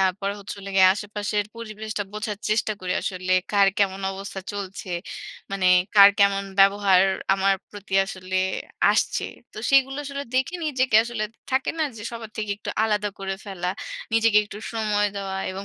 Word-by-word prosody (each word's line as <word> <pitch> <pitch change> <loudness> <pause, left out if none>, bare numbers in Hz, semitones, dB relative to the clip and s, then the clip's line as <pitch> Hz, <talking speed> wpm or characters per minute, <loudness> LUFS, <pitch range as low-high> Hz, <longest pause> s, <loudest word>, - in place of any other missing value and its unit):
তারপর 190 +1 +1
হচ্ছে 200 0 -7
হলো 200 0 -7
গিয়ে 190 -1 +8
আশেপাশের 205 0 -2
পরিবেশটা 215 -2 -5
বোঝার 210 -1 -4
চেষ্টা 215 0 +1
করি 180 -1 -2
আসলে 185 0 -2 0.2
কার 200 -1 +5
কেমন 195 -1 +1
অবস্থা 195 0 -6
চলছে। 195 -2 -6 0.6
মানে 195 -2 0 0.3
কার 200 -1 +10
কেমন 200 -1 +4 0.2
ব্যবহার 195 -1 +5 0.3
আমার 195 0 +2 0.2
প্রতি 205 -1 -7
আসলে 185 -1 -5 0.6
আসছে। - - 0 0.3
তো - - -9
সেইগুলো 270 0 +4
আসলে 280 0 -4
দেখে 260 +7 +1
নিজেকে 260 -6 +2
আসলে 235 -2 -3 0.3
থাকে 265 0 +1
না? 315 - +2
যে 210 - -8
সবার 230 -2 -8
থেকে 210 -1 -3
একটু 210 - -6
আলাদা 210 -1 0
করে 195 0 -3
ফেলা। 185 -3 -4 0.5
নিজেকে 225 -2 +5
একটু 205 0 -9
সময় 210 -2 +1
দেওয়া 195 -1 -4
এবং 190 +1 -6
205 Hz, 160 wpm, -24 LUFS, 195-220 Hz, 0.6 s, কার